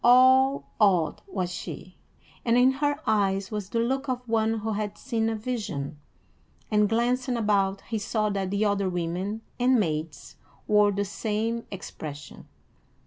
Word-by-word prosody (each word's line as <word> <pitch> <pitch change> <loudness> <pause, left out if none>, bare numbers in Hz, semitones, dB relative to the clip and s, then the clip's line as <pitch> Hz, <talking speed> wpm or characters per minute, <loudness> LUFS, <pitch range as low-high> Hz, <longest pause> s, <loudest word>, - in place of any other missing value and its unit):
All 260 +2 +6 0.2
awed 185 -7 +3
was 185 - -3
she, 180 0 -8 0.4
and 235 0 +3
in 255 +1 +6
her 290 0 +1
eyes 195 -2 +1
was 210 -3 -4
the 230 - -2
look 265 +4 0
of 250 -1 -3
one 225 0 +1
who 220 +1 -2
had 210 -1 -3
seen 225 -4 -1
a 225 - -1
vision; 205 - -4 0.7
and, 210 -1 +3
glancing 245 +2 +1
about, 200 -3 +1
he 225 -2 -3
saw 215 0 0
that 195 -2 -2
the 200 +2 +1
other 200 -2 +1
women 180 +5 -3 0.2
and 250 0 +4
maids 155 -4 -3 0.3
wore 210 -1 +4
the 200 +1 -1
same 220 +3 -2
expression. 155 -6 -8
215 Hz, 150 wpm, -26 LUFS, 195-240 Hz, 0.7 s, All